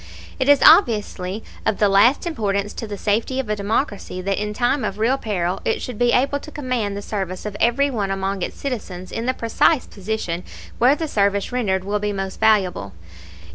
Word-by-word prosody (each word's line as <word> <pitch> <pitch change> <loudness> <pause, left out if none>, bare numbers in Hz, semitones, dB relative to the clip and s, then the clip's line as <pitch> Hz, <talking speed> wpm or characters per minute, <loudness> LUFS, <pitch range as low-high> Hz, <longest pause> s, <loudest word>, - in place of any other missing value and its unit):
It 260 +1 +1
is 285 - +6
obviously 215 - +4 0.2
of 210 - 0
the 210 - +3
last 205 - +4
importance 205 - -1
to 225 - -6
the 205 -1 -6
safety 225 +6 0
of 255 -5 -3
a 210 - +1
democracy 205 -2 -2
that 195 +1 -1
in 210 0 -2
time 245 +5 0
of 195 - -3
real 230 +5 +2
peril 190 -7 -2
it - - 0
should 245 -4 -6
be 240 0 +3
able 275 +4 +2
to 305 - -11
command 250 -9 -2
the 205 - -6
service 190 -3 -4
of 210 -1 -5
every 275 +4 +2
one 205 -6 -2
among 195 0 -2
its - - -4
citizens 200 -9 -5
in 230 +2 -4
the 255 - +1
precise 245 +5 +2
position 190 -4 -4 0.4
where 255 +4 +5
the 320 +1 -3
service 200 -4 0
rendered 200 -7 0
will 205 +2 -1
be 210 0 -2
most 195 -1 -5
valuable. 190 - +2
210 Hz, 200 wpm, -21 LUFS, 195-250 Hz, 0.4 s, is